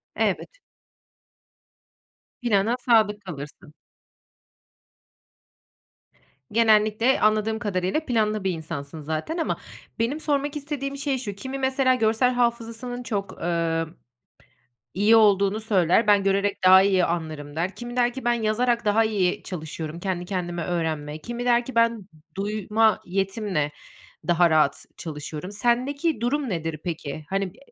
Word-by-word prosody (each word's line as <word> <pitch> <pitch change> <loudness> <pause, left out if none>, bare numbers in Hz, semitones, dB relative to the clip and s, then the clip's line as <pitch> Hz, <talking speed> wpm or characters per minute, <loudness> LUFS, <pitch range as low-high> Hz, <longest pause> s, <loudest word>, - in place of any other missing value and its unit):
Evet. - - -1 1.8
Plana 225 0 +2
sadık 215 -4 +3
kalırsın. 150 -3 -9 2.8
Genellikle 220 +2 +3
anladığım 215 +1 +2
kadarıyla 190 - -1
planlı 215 -4 0
bir 190 - +1
insansın 155 -2 -6
zaten 160 - -3
ama 325 - -1 0.4
benim 260 +7 0
sormak 290 -1 -1
istediğim 280 -1 -4
şey 275 -1 -1
şu: 215 -5 -5
Kimi 265 +6 -6
mesela 265 -1 +2
görsel 225 +2 +2
hafızasının 240 0 -2
çok, 200 -5 -4
emm, 165 -1 0 1.1
iyi 210 +4 +4
olduğunu 205 -1 +4
söyler, 210 -1 +2
"Ben 205 -1 +5
görerek 195 +1 +1
daha 190 +1 +9
iyi 190 -2 +3
anlarım." 155 -3 -4
der. 180 +4 -2
Kimi 240 0 -7
der 245 -1 +2
ki 265 - -7
ben 240 - +3
yazarak 235 +1 0
daha 210 +2 +4
iyi 195 -5 0
çalışıyorum; 160 -2 -6
"Kendi 180 -2 -3
kendime 175 -2 -3
öğrenme..." 155 -4 -2
Kimi 240 +1 -5
der 240 0 +3
ki 260 - -8
ben 230 -4 +2 0.3
duyma 215 +2 +1
yetimle 195 -5 -1 0.6
daha 175 0 +4
rahat 155 -3 +2
çalışıyorum. 155 +3 -6
Sendeki 250 +6 0
durum 270 +1 0
nedir 165 -3 -3
peki? 155 -3 -5
Hani, 195 -2 -1
b - - -22
210 Hz, 125 wpm, -24 LUFS, 175-240 Hz, 2.8 s, daha